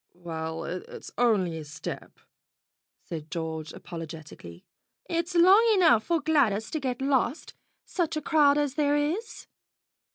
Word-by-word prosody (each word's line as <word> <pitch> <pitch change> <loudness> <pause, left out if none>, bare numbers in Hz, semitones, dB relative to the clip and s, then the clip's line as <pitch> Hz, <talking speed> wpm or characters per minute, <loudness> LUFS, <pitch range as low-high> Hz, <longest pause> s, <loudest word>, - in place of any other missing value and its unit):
"Well, 165 -2 -5
it's 180 +1 -7
only 195 -9 +2
a - - -7
step," 150 +2 -8 0.8
said 160 -2 -7
George 160 -2 -4
apologetically. 155 - -9 0.4
"It's 340 +1 -2
long 370 +5 +7
enough 250 - +4
for 335 -1 +1
Gladys 245 -10 +1
to 315 - -2
get 260 -2 -3
lost, 270 +1 0 0.3
such 325 -4 -2
a - - -2
crowd 290 -3 +4
as 290 -3 0
there 290 -1 +2
is. 330 +11 -2
245 Hz, 130 wpm, -27 LUFS, -, 0.8 s, long